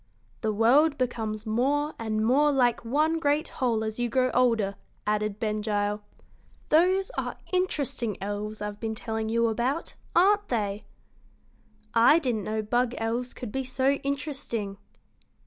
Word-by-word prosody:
"The 220 -2 0
world 270 +8 +4
becomes 225 -4 -2
more 280 +7 +1
and 220 -1 -1
more 290 +5 +4
like 245 -4 +2
one 305 +7 +1
great 295 +1 +1
whole 230 -4 0
as 220 +1 -4
you 240 0 0
grow 255 0 +2
older," 230 -6 +2 0.3
added 210 0 -1
Ben 215 -1 -1
Gile. 205 -1 -1 0.7
"Those 370 +7 +3
are - - -4 0.2
interesting 280 - -1
elves 205 +1 -4
I've 210 0 -5
been 220 -1 -3
telling 220 0 -3
you 230 +1 +2
about, 245 +8 -1 0.2
aren't 405 +4 +4
they?" 210 -3 -2 1.1
"I 235 +7 +6
didn't 240 - -1
know 215 0 -2
bug 240 +3 0
elves 235 +2 -2
could 240 -4 -6
be 265 +3 -2
so 260 +1 +1
interesting." 275 -8 -3
235 Hz, 145 wpm, -27 LUFS, 215-280 Hz, 1.1 s, I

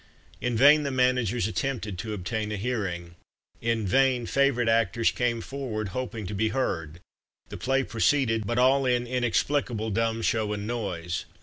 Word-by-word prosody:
In 120 -2 -1
vain 145 +5 +7
the 140 - -2
managers 125 -5 +1
attempted 110 -4 -3
to 110 +3 -4
obtain 105 +3 -3
a 105 - -2
hearing 95 -7 -3 0.5
in 115 -2 0
vain 130 +3 +2
favourite 140 -2 +2
actors 115 -1 +2
came 120 -2 -1
forward, 115 -6 -4
hoping 115 0 -4
to 90 - -5
be 110 +2 +1
heard 85 - -2 0.5
the - - -7
play 135 +1 +1
proceeded, 115 -3 +1
but 120 - -1
all 130 +2 +4
in 125 -1 +1
"inexplicable 120 -2 0
dumb 115 +1 0
show 110 -2 0
and 105 0 -4
noise." 95 -7 -3
115 Hz, 160 wpm, -27 LUFS, 105-125 Hz, 0.5 s, vain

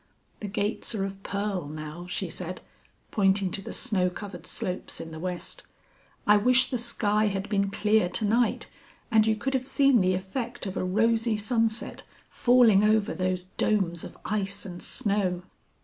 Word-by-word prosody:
The 210 - -5
gates 205 +3 -2
are 195 -2 -1
of 195 0 -7
pearl 200 -5 -3
now," 155 +3 -7
she 190 +1 -2
said, 180 +2 -6 0.5
pointing 195 -2 +2
to 195 - -2
the - - -7
snow 195 -8 +1
covered 195 +1 -8
slopes 180 0 -3
in 165 - -7
the 160 - -7
west. 180 0 -5 0.6
"I 210 0 +6
wish 250 +4 +3
the 250 - 0
sky 215 -2 +1
had 195 0 -2
been 200 -2 +1
clear 210 -1 +2
to 215 - 0
night 230 +3 +2 0.5
and 220 -1 +5
you 220 - +3
could 270 +6 -3
have 260 -1 -1
seen 275 -5 +4
the 185 0 +2
effect 210 +7 -4
of 190 - -4
a - - -1
rosy 225 +4 +2
sunset 225 +1 -1 0.3
falling 240 -5 +5
over 215 0 +3
those 185 -1 -1 0.2
domes 180 -6 +1
of - - -9
ice 200 -1 -2
and 175 -2 -8
snow." 195 -4 0
205 Hz, 170 wpm, -27 LUFS, 185-220 Hz, 0.6 s, I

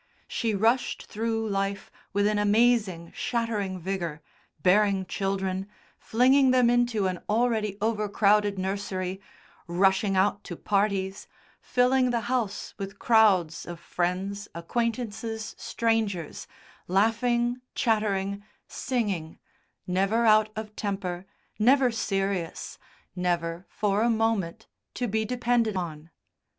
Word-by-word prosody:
She 225 -3 -1
rushed 230 +5 +1
through 225 0 -2
life 195 0 -2 0.2
with 205 +1 +1
an 210 0 +2
amazing 205 -5 +2
shattering 220 -6 -2
vigour, 170 -4 -4 0.4
bearing 195 0 +3
children, 195 0 -2 0.3
flinging 260 +4 +4
them 250 -2 +4
into 240 -4 +2
an 185 -2 -1
already 215 -2 +1
overcrowded 210 -2 +2
nursery, 190 0 -3 0.5
rushing 190 +2 +2
out 200 +1 +2
to 175 - -6
parties, 195 0 -1 0.3
filling 255 +1 +2
the 235 -1 0
house 235 -4 -2
with 195 +1 -6
crowds 200 -9 +3
of 175 -1 -7
friends, 185 +4 -2
acquaintances, 225 +3 -3
strangers, 220 -8 -1 0.4
laughing, 235 +5 +1
chattering, 200 -3 0 0.2
singing, 200 -11 -2 0.5
never 195 +6 +1
out 215 -1 +5
of 215 -1 -6
temper, 195 -3 -3 0.3
never 255 +3 +5
serious, 195 -5 -2 0.4
never, 175 -1 -1
for 205 0 0
a 235 - +3
moment, 220 -4 0 0.3
to 245 - -1
be 220 +1 0
depended 240 -2 +1
on. 160 -3 -5
205 Hz, 110 wpm, -27 LUFS, 190-230 Hz, 0.5 s, out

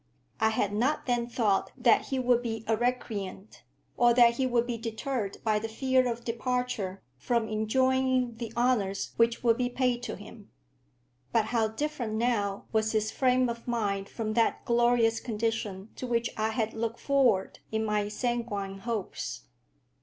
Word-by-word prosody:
I 220 -1 +4
had 205 -2 0
not 255 +8 +1
then 240 -2 0
thought 220 -5 +1
that 240 -3 +4
he 270 - -1
would 245 -2 +3
be 225 -2 -4
a 225 - +3
recreant, 220 -4 -3 0.3
or 240 -1 +4
that 235 -1 +6
he 265 - +1
would 240 -1 +2
be 240 -1 -2
deterred 225 -1 -3
by 215 -2 +2
the 225 +1 -5
fear 255 +2 +2
of 235 0 -6
departure 235 -5 -2 0.2
from 235 - 0
enjoying 255 +2 +1
the 230 -2 -5
honours 225 -6 +1
which 230 +1 +2
would 230 -1 +4
be 250 -1 0
paid 250 -1 0
to 245 - -4
him. - - -13 0.8
But 225 -2 +3
how 225 -2 +3
different 245 -1 -3
now 220 -4 0
was 220 0 +1
his 215 0 +1
frame 255 -1 +3
of 235 0 -6
mind 200 -5 -1
from 215 -2 -3
that 230 0 +1
glorious 235 -1 +3
condition 220 -3 -3
to 255 - -4
which 235 -1 0
I 220 0 0
had 225 -1 -1
looked 230 +1 -3
forward 255 -9 +2
in 220 0 0
my 210 -1 0
sanguine 210 -4 -3
hopes! 215 - -4
230 Hz, 165 wpm, -29 LUFS, 215-245 Hz, 0.8 s, that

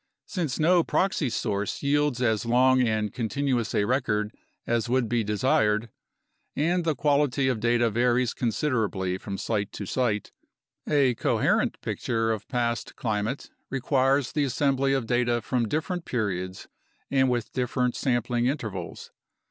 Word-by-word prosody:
Since 165 -9 -3
no 170 +2 +4
proxy 185 -8 0
source 100 0 -2
yields 145 -3 +1
as 110 -3 +1
long 130 +2 +4
and 110 -3 0
continuous 125 0 -1
a - - +3
record 105 -3 0 0.3
as 115 -1 0
would 125 -1 +2
be 120 0 +1
desired, 110 0 +1 0.7
and 170 +5 +1
the 160 -2 0
quality 140 -1 +2
of 125 -4 0
data 120 +1 +2
varies 120 +2 +2
considerably 110 -7 -1
from 100 0 -5
site 100 -2 -2
to 100 - -5
site, 110 -1 -1 0.6
a 140 -4 +3
coherent - - +1
picture 115 -1 -1
of 110 -2 -4
past 120 -2 -2
climate 110 +3 -2 0.2
requires 135 0 +1
the 150 - +1
assembly 135 0 +1
of 135 -4 0
data 120 0 +1
from 120 0 -1
different 165 - -2
periods 95 -6 -3 0.4
and 130 -1 +3
with 120 -2 -1
different 125 0 0
sampling 120 -2 0
intervals. 110 - -4
120 Hz, 140 wpm, -26 LUFS, 110-135 Hz, 0.7 s, no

